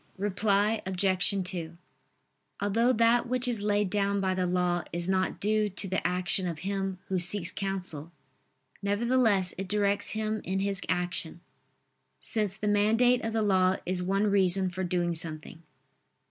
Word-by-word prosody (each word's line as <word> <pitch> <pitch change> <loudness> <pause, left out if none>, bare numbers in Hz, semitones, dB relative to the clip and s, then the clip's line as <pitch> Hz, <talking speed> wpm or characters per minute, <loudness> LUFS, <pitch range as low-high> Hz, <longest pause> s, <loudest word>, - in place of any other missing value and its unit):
Reply 205 +2 +1
Obj. 190 +1 0
2: 170 -3 -5 0.8
Although 225 +5 +2
that 235 0 +3
which 250 0 +1
is 235 -4 0
laid 205 -2 0
down 200 0 +1
by 190 -1 0
the 185 -1 -1
law 175 -1 0
is 175 +1 -1
not 190 0 0
due 215 0 +1
to 195 +1 -3
the 190 -1 -1
action 180 +1 +1
of 170 -3 -4
him 195 -1 -2
who 190 -1 -1
seeks 175 0 +1
counsel, 180 -5 -4 0.7
nevertheless 205 -2 +1
it 195 - -4
directs 205 0 +1
him 215 0 -2
in 190 +1 -2
his 195 -1 -1
action: 175 -1 -2 0.8
since 210 -4 -1
the 215 - -3
mandate 225 +4 +3
of 225 - -3
the 220 -1 +1
law 190 -2 +3
is 180 0 +2
one 195 +3 0
reason 190 -2 +3
for 185 +1 -4
doing 175 -1 -1
something. 160 0 -2
195 Hz, 155 wpm, -28 LUFS, 180-210 Hz, 0.8 s, that